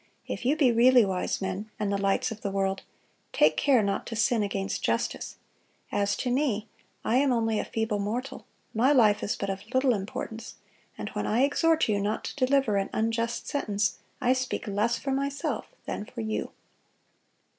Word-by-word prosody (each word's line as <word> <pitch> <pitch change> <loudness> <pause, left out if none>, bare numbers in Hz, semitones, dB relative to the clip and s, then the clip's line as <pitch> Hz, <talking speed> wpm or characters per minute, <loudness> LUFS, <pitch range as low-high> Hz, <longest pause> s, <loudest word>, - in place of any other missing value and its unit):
If - - -5
you 275 +4 +3
be 270 -6 +5
really 240 0 +6
wise 190 0 -2
men, 190 +3 -3
and 205 -1 0
the - - +1
lights 195 +4 +1
of 220 -1 -7
the 200 - -2
world, 195 0 -1 0.5
take 155 +1 +4
care 260 -6 +4
not 200 0 -1
to 230 - -5
sin 225 +1 +2
against 195 -1 -2
justice. - - -1 0.6
As 200 -1 +1
to 250 - -1
me, 245 -5 0 0.4
I 235 - +3
am 275 0 +3
only 225 -2 +1
a - - 0
feeble 220 -2 -1
mortal; 245 +7 -4 0.3
my 245 +6 +3
life 215 -6 +4
is 205 - -1
but 200 -1 -2
of 195 0 -5
little 260 -1 +4
importance; 220 +3 -5 0.4
and - - -5
when - - -3
I 235 +5 +3
exhort 320 +3 +3
you 205 -2 +1
not 210 +2 -1
to 260 - -1
deliver 265 -6 +2
an 195 0 -1
unjust 230 +1 -1
sentence, 205 -8 -1 0.2
I 250 - +3
speak 260 -1 -2
less 215 +3 0
for 275 - -3
myself 280 +1 -2 0.2
than 205 - -4
for 235 - -7
you." 220 -1 -3
225 Hz, 185 wpm, -28 LUFS, 200-255 Hz, 0.6 s, really